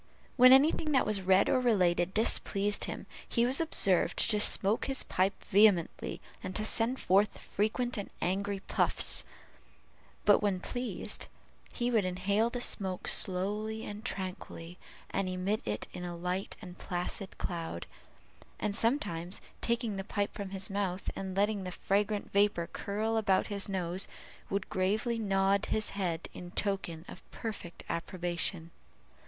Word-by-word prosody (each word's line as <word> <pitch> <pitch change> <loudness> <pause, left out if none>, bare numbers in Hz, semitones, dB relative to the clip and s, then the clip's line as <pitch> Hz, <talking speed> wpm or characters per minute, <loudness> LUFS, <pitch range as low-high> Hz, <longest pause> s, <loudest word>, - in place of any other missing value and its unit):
When 255 0 +8
any 275 +4 +7
thing 305 -2 -2
that 265 - +3
was 210 -2 +1
read 190 +1 +4
or 260 - +3
related 185 -7 +2
displeased 205 -1 +3
him, - - -6 0.2
he 235 -1 +2
was 260 +5 +2
observed 195 - +2
to 210 - +3
smoke 205 +1 +4
his 270 -1 0
pipe 190 +2 -1
vehemently, 200 -4 +3 0.2
and 185 - -6
to 215 - 0
send 230 +4 +2
forth, 200 +3 +2
frequent, 225 +3 -2
and 200 - -6
angry 195 +2 -1
puffs; - - +3 1.0
but 205 - +6
when 200 -3 0
pleased, 245 +6 -4 0.4
he 245 0 -1
would 220 -4 +3
inhale 200 +5 0
the 245 0 -5
smoke 190 -6 -1
slowly 210 +4 +1
and 210 +1 -7
tranquilly, 185 -5 -5 0.3
and 195 -1 -1
emit 185 +4 -1
it 105 0 -3
in 175 -1 -6
light 180 +2 -3
and 180 -2 -10
placid 180 +2 -4
clouds, 165 - -4 0.7
and 200 - -1
sometimes, 200 - 0 0.2
taking 235 -3 -1
the 195 - -3
pipe 205 0 -2
from 200 -2 -6
his 190 0 -1
mouth, 195 -2 -2
and 190 -1 -5
letting 205 0 +1
the 180 - -5
fragrant 205 +3 -1
vapor 200 -4 +2
curl 220 +3 -2
about 195 -4 +2
his 200 0 0
nose, 185 -1 -2 0.4
would 200 -1 -2
gravely 215 +5 0
nod 195 -1 +1
his 215 -1 0
head 175 -4 -3
in 175 - -9
token 180 -4 -2
of - - -10
perfect 210 -6 -7
approbation. 170 -1 -2
200 Hz, 150 wpm, -31 LUFS, 185-215 Hz, 1.0 s, When